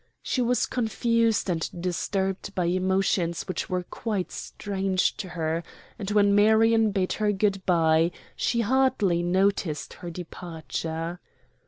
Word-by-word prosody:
She 255 Hz, -, 0 dB
was 245 Hz, +1 st, +2 dB
confused 230 Hz, -2 st, +1 dB
and 165 Hz, -3 st, -1 dB
disturbed 190 Hz, +2 st, -2 dB
by 180 Hz, -, +1 dB
emotions 185 Hz, -1 st, +1 dB
which 185 Hz, -, -4 dB
were 180 Hz, -1 st, -1 dB
quite 200 Hz, 0 st, -3 dB
strange 190 Hz, -2 st, -1 dB
to 190 Hz, -, -5 dB
her, 165 Hz, -1 st, -2 dB, 0.4 s
and 200 Hz, -2 st, -4 dB
when 205 Hz, -1 st, +4 dB
Marion 220 Hz, +2 st, +5 dB
bade 195 Hz, -2 st, 0 dB
her 210 Hz, -1 st, +1 dB
good 195 Hz, -1 st, 0 dB
by 165 Hz, -2 st, +4 dB, 0.3 s
she 235 Hz, -1 st, +1 dB
hardly 230 Hz, -7 st, +2 dB
noticed 180 Hz, -3 st, 0 dB
her 175 Hz, -, -5 dB
departure. 165 Hz, -1 st, -5 dB
190 Hz, 130 wpm, -26 LUFS, 175-210 Hz, 0.4 s, Marion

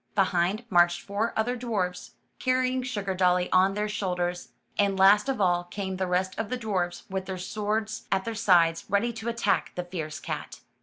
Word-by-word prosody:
Behind, 190 Hz, +3 st, +1 dB
marched 175 Hz, -1 st, +4 dB
four 205 Hz, +3 st, -2 dB
other 240 Hz, +3 st, +1 dB
dwarfs, 205 Hz, -7 st, -3 dB, 0.3 s
car 255 Hz, 0 st, +3 dB
rying 255 Hz, 0 st, +1 dB
Sugardolly 190 Hz, -6 st, +1 dB
on 190 Hz, +1 st, +4 dB
their 210 Hz, 0 st, -1 dB
shoulders, 180 Hz, -4 st, -2 dB, 0.3 s
and 200 Hz, -1 st, +2 dB
last 205 Hz, +6 st, +5 dB
of 265 Hz, -, -1 dB
all 175 Hz, -2 st, +2 dB
came 190 Hz, +1 st, -4 dB
the 190 Hz, 0 st, -1 dB
rest 185 Hz, +1 st, 0 dB
of 225 Hz, -, -2 dB
the 255 Hz, -, -2 dB
dwarfs 190 Hz, -7 st, -2 dB
with 190 Hz, 0 st, -4 dB
their 190 Hz, -1 st, -4 dB
swords 215 Hz, +3 st, -3 dB
at 190 Hz, 0 st, +1 dB
their 230 Hz, -, -3 dB
sides, 175 Hz, -7 st, +3 dB
ready 205 Hz, +4 st, +1 dB
to 225 Hz, +1 st, -4 dB
attack 230 Hz, -3 st, 0 dB
the 180 Hz, -, -2 dB
fierce 165 Hz, -4 st, -5 dB
cat. -, -, -6 dB
195 Hz, 185 wpm, -27 LUFS, 180-220 Hz, 0.3 s, last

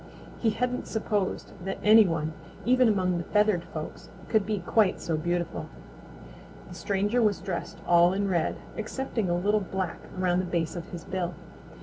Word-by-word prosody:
He 230 Hz, -, +2 dB
hadn't 250 Hz, +3 st, -1 dB
supposed 210 Hz, -3 st, -1 dB
that 195 Hz, +1 st, -3 dB
any 215 Hz, 0 st, +8 dB
one, 160 Hz, -2 st, -1 dB, 0.3 s
even 255 Hz, +1 st, +5 dB
among 185 Hz, -4 st, +2 dB
the -, -, -3 dB
feathered 210 Hz, -2 st, +2 dB
folks, 155 Hz, -1 st, -7 dB, 0.2 s
could 215 Hz, -3 st, +2 dB
be 215 Hz, -1 st, 0 dB
quite 190 Hz, +2 st, +2 dB
so 165 Hz, -1 st, -1 dB
beautiful. 170 Hz, +1 st, -2 dB, 1.0 s
The -, -, -10 dB
stranger 205 Hz, +4 st, 0 dB
was 210 Hz, -5 st, +2 dB
dressed 185 Hz, -1 st, -4 dB
all 175 Hz, 0 st, +6 dB
in 200 Hz, +1 st, 0 dB
red, 175 Hz, -4 st, +1 dB, 0.2 s
excepting 225 Hz, -2 st, -2 dB
a 175 Hz, -, +2 dB
little 205 Hz, +4 st, +2 dB
black 190 Hz, -3 st, -3 dB, 0.2 s
around 180 Hz, -1 st, +2 dB
the 185 Hz, -, 0 dB
base 170 Hz, -2 st, -1 dB
of 170 Hz, -2 st, -6 dB
his 170 Hz, -2 st, -7 dB
bill. 180 Hz, -2 st, -3 dB
190 Hz, 165 wpm, -28 LUFS, 175-215 Hz, 1.0 s, any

